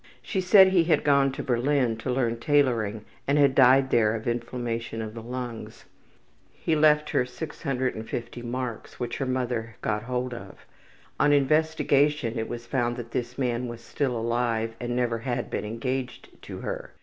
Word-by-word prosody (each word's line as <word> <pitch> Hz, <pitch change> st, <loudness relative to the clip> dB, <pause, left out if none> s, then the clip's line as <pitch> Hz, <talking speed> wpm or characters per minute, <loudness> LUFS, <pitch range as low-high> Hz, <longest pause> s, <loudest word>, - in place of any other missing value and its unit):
She 190 Hz, -, -1 dB
said 190 Hz, +1 st, +7 dB
he 180 Hz, -3 st, +3 dB
had 160 Hz, -3 st, +2 dB
gone 140 Hz, -1 st, +4 dB
to -, -, -5 dB
Berlin 125 Hz, -1 st, +1 dB
to 115 Hz, -, -5 dB
learn 120 Hz, -2 st, 0 dB
tailoring 115 Hz, -7 st, +1 dB, 0.2 s
and 140 Hz, +1 st, +3 dB
had 140 Hz, -2 st, +5 dB
died 130 Hz, 0 st, +5 dB
there 115 Hz, -2 st, +3 dB
of 110 Hz, +1 st, -6 dB
inflammation 120 Hz, -1 st, -3 dB
of 110 Hz, -1 st, -5 dB
the 115 Hz, -, -7 dB
lungs. 120 Hz, -1 st, -7 dB, 0.7 s
He 160 Hz, -, -1 dB
left 150 Hz, 0 st, +4 dB
her -, -, +2 dB
650 125 Hz, -4 st, -4 dB
marks 120 Hz, -1 st, -5 dB
which 120 Hz, -1 st, -3 dB
her 135 Hz, -, -1 dB
mother 120 Hz, -3 st, -2 dB
got 105 Hz, -1 st, 0 dB
hold 125 Hz, +2 st, -3 dB
of. 100 Hz, -5 st, -10 dB, 0.5 s
On 145 Hz, -, +4 dB
investigation 145 Hz, -3 st, +2 dB
it 110 Hz, -, -3 dB
was 120 Hz, 0 st, -6 dB
found 120 Hz, -1 st, -1 dB
that 115 Hz, -1 st, -7 dB
this 120 Hz, +1 st, -3 dB
man 125 Hz, -2 st, -1 dB
was 120 Hz, -1 st, -7 dB
still 125 Hz, +1 st, -2 dB
alive 115 Hz, -1 st, 0 dB
and 120 Hz, 0 st, -3 dB
never 120 Hz, -2 st, 0 dB
had 120 Hz, +1 st, -3 dB
been -, -, -2 dB
engaged 125 Hz, +3 st, -4 dB
to -, -, -8 dB
her. -, -, -5 dB
125 Hz, 170 wpm, -26 LUFS, 115-135 Hz, 0.7 s, said